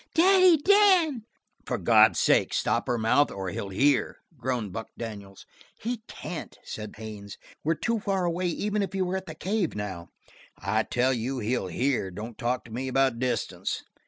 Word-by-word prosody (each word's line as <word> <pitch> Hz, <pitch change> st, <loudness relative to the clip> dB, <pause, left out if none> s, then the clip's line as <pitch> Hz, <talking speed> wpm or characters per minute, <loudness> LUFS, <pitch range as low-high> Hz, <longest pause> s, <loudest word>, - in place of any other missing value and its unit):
Daddy 370 Hz, 0 st, +6 dB
Dan!" 350 Hz, -, +4 dB, 0.4 s
"For -, -, -2 dB
God's -, -, +5 dB
sake, -, -, +3 dB
stop -, -, 0 dB
her 120 Hz, -2 st, +1 dB
mouth 115 Hz, +6 st, +3 dB
or 95 Hz, -1 st, -5 dB
he'll 100 Hz, +3 st, -5 dB
hear!" 135 Hz, +8 st, +2 dB, 0.2 s
groaned 120 Hz, -6 st, -3 dB
Buck 110 Hz, -, -5 dB
Daniels. 100 Hz, -4 st, -8 dB, 0.3 s
"He 235 Hz, 0 st, -3 dB
can't!" 175 Hz, -3 st, -7 dB
said 110 Hz, -1 st, -7 dB
Haines. 105 Hz, -2 st, -8 dB, 0.3 s
"We're 165 Hz, +2 st, +1 dB
too 230 Hz, +6 st, -1 dB
far 195 Hz, -3 st, -1 dB
away 175 Hz, +1 st, 0 dB
even 205 Hz, +4 st, -1 dB
if 195 Hz, -, -3 dB
he 190 Hz, -1 st, 0 dB
were 180 Hz, +1 st, -2 dB
at 190 Hz, 0 st, -4 dB
the 160 Hz, -, -7 dB
cave 190 Hz, +1 st, -1 dB
now." 95 Hz, -5 st, -5 dB, 0.5 s
"I 100 Hz, +5 st, 0 dB
tell 125 Hz, +4 st, +1 dB
you 125 Hz, +3 st, -2 dB
he'll 120 Hz, -3 st, -1 dB
hear! 120 Hz, +1 st, 0 dB
Don't 110 Hz, +5 st, -7 dB
talk 120 Hz, +3 st, -2 dB
to 115 Hz, -, -13 dB
me 130 Hz, +3 st, -3 dB
about 130 Hz, -2 st, +1 dB
distance." 125 Hz, -2 st, -2 dB
130 Hz, 175 wpm, -27 LUFS, -, 0.5 s, Daddy